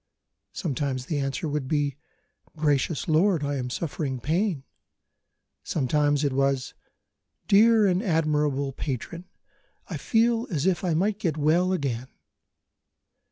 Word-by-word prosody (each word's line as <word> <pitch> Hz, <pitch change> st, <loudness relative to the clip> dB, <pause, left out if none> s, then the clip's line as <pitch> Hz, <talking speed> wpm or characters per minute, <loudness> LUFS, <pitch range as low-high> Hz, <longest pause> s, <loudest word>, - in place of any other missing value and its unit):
Sometimes 135 Hz, -5 st, -3 dB
the 145 Hz, +1 st, -2 dB
answer 135 Hz, +2 st, -2 dB
would 145 Hz, -2 st, -2 dB
be: 145 Hz, -2 st, 0 dB, 0.6 s
"Gracious 150 Hz, 0 st, 0 dB
lord, 165 Hz, 0 st, +3 dB
I 145 Hz, 0 st, -1 dB
am 125 Hz, -1 st, -3 dB
suffering 140 Hz, -2 st, -3 dB
pain." 165 Hz, -, 0 dB, 1.0 s
Sometimes 145 Hz, +1 st, +1 dB
it 140 Hz, -2 st, +1 dB
was: 135 Hz, -1 st, 0 dB, 0.7 s
"Dear 220 Hz, +1 st, +6 dB
and 185 Hz, -1 st, +2 dB
admirable 150 Hz, -, 0 dB
patron, 140 Hz, +6 st, -5 dB, 0.7 s
I -, -, -2 dB
feel 230 Hz, +1 st, +1 dB
as 160 Hz, -5 st, -1 dB
if 185 Hz, -3 st, +1 dB
I 175 Hz, -3 st, +1 dB
might 200 Hz, +5 st, 0 dB
get 165 Hz, -7 st, -1 dB
well 165 Hz, +5 st, +2 dB
again." 130 Hz, -8 st, -2 dB
150 Hz, 120 wpm, -26 LUFS, 140-180 Hz, 1.0 s, Dear